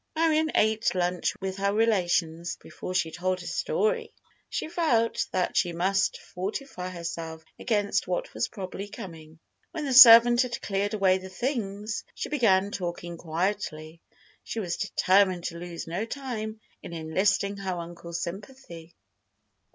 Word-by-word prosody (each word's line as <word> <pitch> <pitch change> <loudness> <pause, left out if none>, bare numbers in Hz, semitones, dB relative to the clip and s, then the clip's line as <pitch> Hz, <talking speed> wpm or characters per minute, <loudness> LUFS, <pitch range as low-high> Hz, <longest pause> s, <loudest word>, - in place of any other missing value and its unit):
Marion 315 -1 +2
ate 220 -1 +2
lunch 180 0 0
with 190 0 -3
her 200 0 +1
relations 175 -6 +1
before 185 - -7
she 165 -3 +1
told 185 +2 -1
her 175 - -9
story. 460 +1 -1 0.4
She - - -3
felt 315 -10 +1
that 185 -1 -1
she 175 -2 +2
must 190 +3 +1
fortify 185 0 -5
herself 165 -2 -6
against 205 -3 0
what 180 -1 -2
was - - -1
probably 195 -1 -6
coming. 165 -6 -10 0.4
When 315 -3 -3
the 270 - -1
servant 240 -1 +10
had 245 -2 -2
cleared 205 +2 -1
away 190 -2 +3
the 190 0 -9
things, 210 -1 -3
she - - -4
began 205 -9 +3
talking 175 -2 -4
quietly. 165 -1 -3 0.4
She 230 - -4
was 175 -5 -2
determined 185 -2 +2
to 170 -1 -5
lose 170 -1 -6
no 175 +5 -3
time 225 -4 -5 0.2
in - - -9
enlisting 190 +5 0
her 190 -2 -3
uncle's 170 0 -6
sympathy. 175 -4 -9
190 Hz, 145 wpm, -27 LUFS, 175-220 Hz, 0.4 s, servant